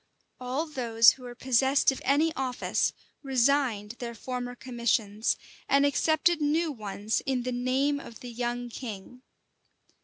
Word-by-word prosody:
All 255 Hz, +5 st, -2 dB
those 235 Hz, -6 st, +5 dB
who 265 Hz, -, -12 dB
were 245 Hz, -1 st, -8 dB
possessed 265 Hz, +3 st, +3 dB
of 265 Hz, -, -7 dB
any 305 Hz, +4 st, +2 dB
office 255 Hz, -2 st, 0 dB, 0.3 s
resigned 260 Hz, -5 st, +1 dB
their 235 Hz, -1 st, -5 dB
former 245 Hz, +1 st, -5 dB
commissions, 235 Hz, -4 st, 0 dB, 0.3 s
and 280 Hz, +1 st, +4 dB
accepted 315 Hz, +3 st, +2 dB
new 310 Hz, +2 st, +1 dB
ones 210 Hz, -3 st, -3 dB
in 260 Hz, -2 st, 0 dB
the 255 Hz, -, -2 dB
name 260 Hz, +4 st, 0 dB
of 235 Hz, -5 st, -11 dB
the 245 Hz, -, -7 dB
young 240 Hz, +1 st, -3 dB
king. 235 Hz, 0 st, -8 dB
250 Hz, 135 wpm, -28 LUFS, 235-280 Hz, 0.3 s, those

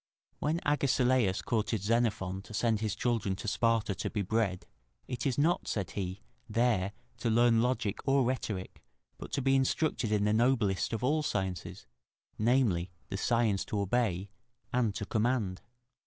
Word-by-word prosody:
When 155 Hz, +3 st, 0 dB
Agesilaus 130 Hz, -7 st, +2 dB
courted 110 Hz, -3 st, -1 dB
Xenophon 100 Hz, -4 st, 0 dB
to 110 Hz, -, -8 dB
send 115 Hz, -1 st, +1 dB
his 110 Hz, -2 st, -2 dB
children 115 Hz, -6 st, 0 dB
to 100 Hz, +3 st, -7 dB
Sparta 115 Hz, -1 st, +1 dB
to -, -, -3 dB
be 105 Hz, -3 st, -2 dB
bred, 100 Hz, -2 st, 0 dB, 0.4 s
"it 125 Hz, +2 st, -2 dB
is 130 Hz, -, -1 dB
not," 165 Hz, +5 st, +2 dB
said 100 Hz, -4 st, -2 dB
he, 95 Hz, 0 st, -4 dB, 0.3 s
"there 105 Hz, -4 st, +1 dB, 0.2 s
to 120 Hz, -, -1 dB
learn 115 Hz, 0 st, +4 dB
logic 120 Hz, -4 st, 0 dB
or 135 Hz, 0 st, +4 dB
rhetoric, 110 Hz, -7 st, -3 dB, 0.4 s
but -, -, -8 dB
to 140 Hz, -, 0 dB
be 135 Hz, 0 st, +3 dB
instructed 135 Hz, -3 st, +1 dB
in 105 Hz, -1 st, +2 dB
the 105 Hz, +1 st, +2 dB
noblest 115 Hz, -4 st, +2 dB
of 115 Hz, 0 st, -3 dB
all 150 Hz, +4 st, +2 dB
sciences, 95 Hz, -, -3 dB, 0.5 s
namely, 110 Hz, -7 st, +2 dB, 0.2 s
the 95 Hz, -, -3 dB
science 110 Hz, -3 st, +1 dB
to 105 Hz, -, -2 dB
obey 100 Hz, -2 st, 0 dB, 0.4 s
and 115 Hz, -5 st, +1 dB
to 105 Hz, -, -3 dB
command." 110 Hz, -4 st, 0 dB
110 Hz, 155 wpm, -31 LUFS, 100-125 Hz, 0.5 s, learn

